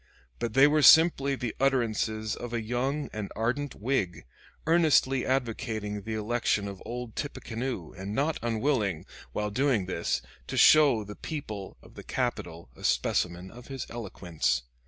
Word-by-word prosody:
But 120 -1 -3
they 135 +1 +8
were 150 +1 +4
simply 145 -3 +6
the 125 -3 -4
utterances 110 -5 0
of 120 -1 -7
a 115 - -1
young 130 +6 -1
and 105 -2 -5
ardent 125 +6 -1
Whig, 100 - -2 0.4
earnestly 155 -5 +3
advocating 115 -5 -2
the 110 +2 -4
election 110 -1 0
of 100 -1 -8
"old 120 -1 -6
Tippecanoe" 120 - -4
and 95 +3 -6
not 150 +5 0
unwilling, 115 - 0 0.3
while 105 0 -2
doing 125 -4 +1
this, 90 -2 -2 0.2
to - - -4
show 145 -8 +6
the 105 0 -9
people 110 - -6
of - - -16
the - - -9
capital 85 -6 -3
a - - -14
specimen 90 +1 0
of 120 +1 -13
his 135 -2 -5
eloquence. 85 - -2
115 Hz, 150 wpm, -28 LUFS, 105-135 Hz, 0.4 s, they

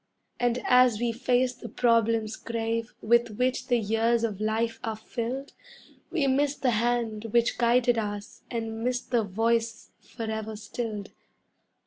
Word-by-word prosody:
And 245 0 +1
as 250 -3 +5
we 240 0 +1
face 250 +1 +1
the 245 - -9
problems 230 -2 +2
grave 230 0 -3
with 235 -1 +3
which 255 0 0
the 245 - +3
years 225 +2 +1
of 210 -3 -2
life 225 +1 0
are 225 -1 -2
filled, 240 +5 -5 0.6
We 310 -5 0
miss 275 +2 +2
the 255 -3 +1
hand 230 -1 0
which 235 +1 +1
guided 240 0 +3
us 205 -1 -5
and 225 -1 -4
miss 250 0 +1
the 240 -1 0
voice 225 +3 -1
forever 220 -2 -5
stilled. 215 -1 -5
230 Hz, 140 wpm, -27 LUFS, 220-245 Hz, 0.6 s, as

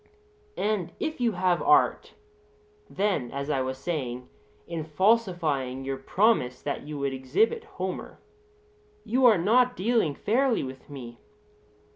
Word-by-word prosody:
And 200 -5 -1
if 310 -4 -3
you 235 -2 +2
have 180 -1 +1
art, 360 +1 +3 0.7
then, 190 -11 -1
as 140 +3 -4
I 135 - +1
was 130 0 -3
saying, 130 -5 -4 0.4
in 165 -2 -4
falsifying 160 - +1
your 135 0 -2
promise 135 - +1
that 145 - -3
you 150 -1 -5
would 140 -1 -1
exhibit 190 - 0
Homer, 395 -3 -6 0.9
you 250 +2 +4
are 220 -4 +6
not 245 +8 +3
dealing 200 -7 +1
fairly 250 +2 +1
with 130 +1 -9
me. 120 -4 -9
170 Hz, 130 wpm, -27 LUFS, 135-225 Hz, 0.9 s, are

